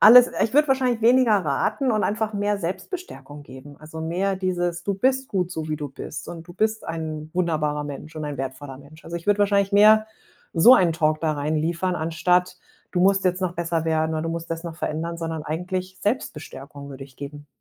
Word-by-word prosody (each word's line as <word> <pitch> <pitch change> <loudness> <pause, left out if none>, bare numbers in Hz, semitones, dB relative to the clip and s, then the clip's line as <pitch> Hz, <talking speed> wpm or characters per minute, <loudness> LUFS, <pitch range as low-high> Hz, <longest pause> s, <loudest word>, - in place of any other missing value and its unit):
alles 245 +3 +9
ich 220 - 0
würde 295 +1 +4
wahrscheinlich 255 -3 +1
weniger 245 0 +5
raten 205 - 0
und 215 -2 +1
einfach 215 +1 -1
mehr 205 0 0
Selbstbestärkung 180 - -6
geben. 140 +1 -12
Also, 155 +1 -9
mehr 185 +4 -1
dieses: 175 -2 -2
„Du 200 - 0
bist 260 +6 +1
gut, 180 -3 -1
so 160 -3 -5
wie 155 - -1
du 145 -1 -5
bist, 145 +2 -8
und 165 -1 -8
du 175 - -11
bist 220 +4 0
ein 155 -1 -5
wunderbarer 155 -4 0
Mensch 145 +2 -8
und 155 - -4
ein 145 -1 -4
wertvoller 135 0 -6
Mensch.“ 145 +3 -16
Also, 170 - -5
ich 170 - -9
würde 205 0 +3
wahrscheinlich 200 -1 +2
mehr 215 +2 +6 0.5
so 205 +10 +8
ein 180 -8 +4
Talk 155 -1 +1
da 160 -2 +1
reinliefern 155 +5 -1
anstatt: 180 +3 +1 0.3
„Du 180 - 0
musst 195 +1 +3
jetzt 180 0 +1
noch 185 -2 -1
besser 170 -1 -1
werden“ 160 0 +1
oder: 155 0 -1
„Du 165 - -3
musst 165 0 -5
das 165 0 -3
noch 165 -2 -6
verändern“, 165 +1 -3
sondern 165 -2 -4
eigentlich 185 +4 -4
Selbstbestärkung 145 - -4
würde 135 0 -8
ich 135 -2 -19
geben. 145 +1 -8
170 Hz, 205 wpm, -24 LUFS, 155-200 Hz, 0.5 s, alles